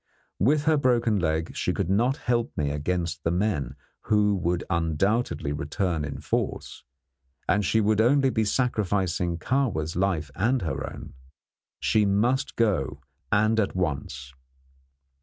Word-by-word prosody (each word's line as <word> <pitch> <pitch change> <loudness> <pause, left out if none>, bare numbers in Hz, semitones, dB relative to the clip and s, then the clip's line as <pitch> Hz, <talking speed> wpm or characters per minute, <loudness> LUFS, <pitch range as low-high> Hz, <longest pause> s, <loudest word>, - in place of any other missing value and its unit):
With 145 - +3
her 155 0 +3
broken 120 -6 +2
leg, 80 -1 -1
she - - 0
could - - -1
not 120 +7 +2
help 120 -1 -1
me 75 -2 0
against 80 +2 -2
the - - +1
men, 85 - -1 0.3
who 105 -1 +3
would 85 -1 -1
undoubtedly 85 0 0
return 80 +2 -2
in 70 -1 -5
force, - - -3 0.6
and 105 +2 +2
she 110 +4 +2
would 110 +1 +3
only 135 +3 +4
be 110 - +1
sacrificing 95 -7 0
Kahwa's 90 - -1
life 85 -5 0
and 120 - +1
her 70 -5 -3
own. - - -10 0.7
She 105 -2 +2
must 120 +8 +1
go, 90 - 0 0.3
and 110 +2 +3
at 100 - 0
once. 70 -6 -3
95 Hz, 140 wpm, -26 LUFS, 80-115 Hz, 0.7 s, only